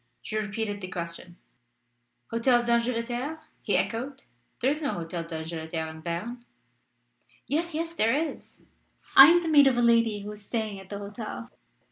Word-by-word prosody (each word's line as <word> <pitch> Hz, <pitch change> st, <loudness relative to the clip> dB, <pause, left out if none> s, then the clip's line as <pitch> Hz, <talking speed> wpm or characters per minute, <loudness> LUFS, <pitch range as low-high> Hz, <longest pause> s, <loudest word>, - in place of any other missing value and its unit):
She 215 Hz, -, -5 dB
repeated 210 Hz, -1 st, -2 dB
the 185 Hz, -, -5 dB
question. 175 Hz, 0 st, -6 dB, 0.9 s
"Hotel 240 Hz, +1 st, +3 dB
d'Angleterre?" 240 Hz, +5 st, -1 dB, 0.2 s
he -, -, +1 dB
echoed. 265 Hz, +4 st, -2 dB, 0.4 s
"There 260 Hz, +3 st, +2 dB
is 300 Hz, +2 st, -2 dB
no 290 Hz, -, -1 dB
Hotel 170 Hz, 0 st, -4 dB
d'Angleterre 160 Hz, 0 st, -5 dB
in 160 Hz, 0 st, -11 dB
Berne." 195 Hz, +10 st, -4 dB, 1.0 s
"Yes, 330 Hz, +3 st, -1 dB
yes; 330 Hz, +1 st, -3 dB
there 230 Hz, -6 st, +2 dB
is. 315 Hz, +1 st, -4 dB, 0.6 s
I -, -, +12 dB
am 345 Hz, +1 st, +5 dB
the -, -, -3 dB
maid 290 Hz, -3 st, +7 dB
of 255 Hz, -2 st, +3 dB
a -, -, +3 dB
lady 230 Hz, -3 st, +3 dB
who 205 Hz, +1 st, -6 dB
is 210 Hz, 0 st, -8 dB
staying 215 Hz, -1 st, -3 dB
at 190 Hz, -1 st, -13 dB
that 200 Hz, -, -5 dB
hotel." 215 Hz, +3 st, -7 dB
230 Hz, 160 wpm, -27 LUFS, 195-260 Hz, 1.0 s, I